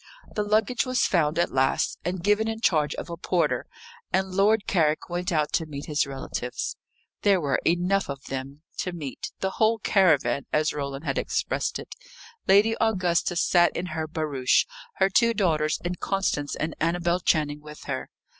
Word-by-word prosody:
The 210 - 0
luggage 215 +3 +1
was 255 -1 +1
found 160 -3 +1
at 170 - +1
last, 135 +1 +1
and 180 0 -3
given 210 +2 +3
in 225 0 -3
charge 155 -9 +2
of - - -6
a 170 -1 -6
porter; 175 0 0 0.4
and 190 0 0
Lord 205 +2 +3
Carrick 160 -4 +1
went 175 +2 -2
out 155 -3 0
to 160 - 0
meet 145 -1 -6
his 150 -1 0
relatives. 135 -2 -4 0.5
There 200 -2 +4
were 145 -4 0
enough 180 +3 +1
of 140 0 -5
them 135 +3 -6 0.2
to 180 - -2
meet 150 -6 -6
the 190 - 0
whole 220 +2 +2
caravan, 175 -10 +2
as 155 0 +1
Roland 140 +1 -4
had 135 - 0
expressed - - -1
it. - - -9 0.5
Lady 210 +3 +5
Augusta 180 -6 +1
sat 175 0 +3
in 175 - -2
her 160 0 -2
barouche 150 -5 +1 0.3
her 190 - +3
two 230 +3 +3
daughters 155 -6 +1
and 175 0 -3
Constance 190 -7 -1
and 155 0 -3
Annabel 170 +2 +1
Channing 150 -4 +1
with 150 0 -11
her. - - -4
170 Hz, 175 wpm, -26 LUFS, 150-195 Hz, 0.5 s, Lady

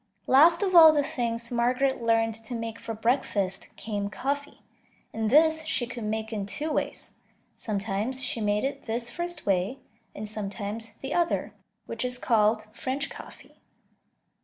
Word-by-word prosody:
Last 335 +7 +6
of 380 -2 0
all 325 -2 +10
the 295 -2 +2
things 235 -4 -2
Margaret 250 +2 +1
learned 225 -1 +2
to 240 - -5
make 230 0 -5
for 230 -1 -5
breakfast 210 -5 0
came 205 -2 -3
coffee, 280 +7 -4 0.5
and 220 -1 -1
this 315 +4 +5
she 310 -6 +1
could 240 -2 -6
make 220 +1 -3
in 200 -2 -3
two 295 +10 -3
ways; - - -3 0.4
sometimes 215 +5 -2
she 235 - -2
made 210 0 +1
it 275 - -3
this 235 +2 -2
first 345 +4 -4
way, 195 +6 +1 0.4
and 215 - -5
sometimes 210 +1 -5
the 270 +6 -6
other, 345 -1 0 0.3
which 230 +1 -4
is 250 0 -2
called 215 -2 +2
French 265 +4 -3
coffee. - - -13
230 Hz, 155 wpm, -27 LUFS, 215-275 Hz, 0.5 s, all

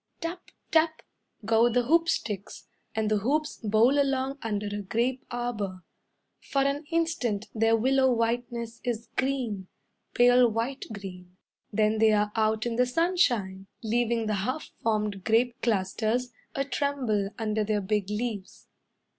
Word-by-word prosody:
Tap! 345 +2 -4 0.3
Tap! 320 0 +2 0.4
go 225 +2 +4
the 245 +1 +2
hoop 330 +6 +3
sticks, 205 - -3 0.3
And 215 -1 0
the 210 - +3
hoops 295 +8 0
bowl 225 +7 +4
along 270 0 -1
under 210 -2 -2
a 205 0 -3
grape 235 +6 -1
arbour. 210 -7 -3 0.6
For 275 -1 0
an 280 +2 -1
instant 320 -11 0
their 225 0 +3
willow 265 +3 +3
whiteness 235 0 -2
is 235 -2 -3
green, 245 -8 -1 0.5
Pale 245 0 +6
white 230 +5 -2
green. 180 -3 -9 0.3
Then 215 +1 +2
they 220 -1 +5
are 210 0 +2
out 220 0 +1
in 235 -1 -2
the 250 0 +3
sunshine, 245 - +1 0.2
Leaving 230 0 +1
the 215 - 0
half 255 +9 -3
formed 210 -3 -1
grape 235 +3 +2
clusters 225 +3 0 0.2
A 275 - 0
tremble 260 -9 0
under 215 -1 0
their 210 0 0
big 205 0 -1
leaves. 210 -2 -4
230 Hz, 140 wpm, -28 LUFS, 210-260 Hz, 0.6 s, Pale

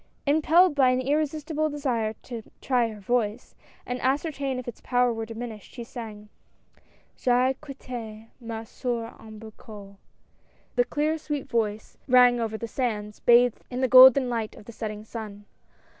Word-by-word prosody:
Impelled 315 +4 +4
by 270 -3 +4
an 255 0 +2
irresistible 305 +3 -1
desire 250 -7 -1
to 235 -3 -7 0.2
try 245 -3 +1
her 215 -1 -9
voice, 225 +1 -1 0.3
and 250 0 -4
ascertain 275 0 -1
if 255 - -7
its 240 - -8
power 245 -1 +2
were 225 0 -5
dimin 230 +1 -6
ished, 210 - -16
she 240 - -6
sang 220 -3 -9 0.4
— - - -34
J'ai 250 +1 +3
quitt^ 240 -6 -8
ma 225 -2 -6
soeur 230 0 -4
au 220 - -13
berceau.'* 210 -2 -12 0.8
The 245 -1 +3
clear, 305 +4 -1
sweet 295 -2 -4
voice 220 -4 -2
rang 250 -1 +6
over 220 -1 -2
the 230 - -5
sands, 210 -4 -3
bathed 240 0 +4
in 250 0 -4
the 260 - +3
golden 260 +1 +8
light 230 -3 -3
of - - -14
the 235 - -9
setting 215 -2 -6
sun. 210 -3 -8
245 Hz, 160 wpm, -26 LUFS, 220-265 Hz, 0.8 s, golden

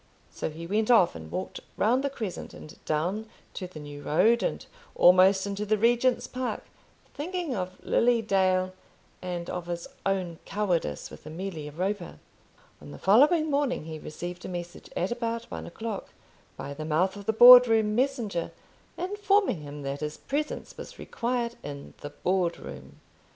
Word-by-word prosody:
So - - -4
he 160 +2 -8
went 215 +5 0
off, 230 -8 +6
and 80 -1 -9
walked 185 - -4 0.2
round 245 +6 +2
the 280 - 0
Crescent, 220 -9 -6
and 155 - -11
down 185 +9 -1 0.2
to 185 - -5
the 175 -4 -10
New 145 -1 -9
Road, 225 +12 +3
and - - -2 0.3
almost 185 +2 +6
into 200 +1 -3
the 215 +1 +1
Regent's 240 +2 +2
Park, 255 0 -4 0.5
thinking 340 -2 -3
of 185 -1 -4
Lily 240 0 +3
Dale 185 -2 +2 0.5
and 175 -2 -4
of 175 -1 -5
his 170 -1 -4 0.2
own 185 -4 -1
cowardice 195 -5 -2
with - - -12
Amelia 160 -2 -6
Roper. 185 +3 -3 0.6
On 75 - -11
the 75 - -9
following 300 - +4
morning 280 - 0
he 160 -1 -6
received 175 +4 -7
a - - -5
message, 175 -1 -7
at 180 +5 0
about 230 -1 -2
one - - -6
o'clock, 220 +3 -5 0.5
by 140 - -6
the 155 +2 -6
mouth 165 +5 +1
of 200 -1 -10
the - - +4
Board 245 +2 +10
room 220 -2 +2
messenger, 225 -8 0 0.5
informing 400 - +1
him 145 0 -8
that 140 +1 -3
his 150 0 -4
presence 300 +2 -4
was - - -9
required 235 0 -2
in 140 -1 -8
the 145 - -6
Board 175 +3 0
room. - - -11
195 Hz, 165 wpm, -27 LUFS, 170-235 Hz, 0.6 s, Board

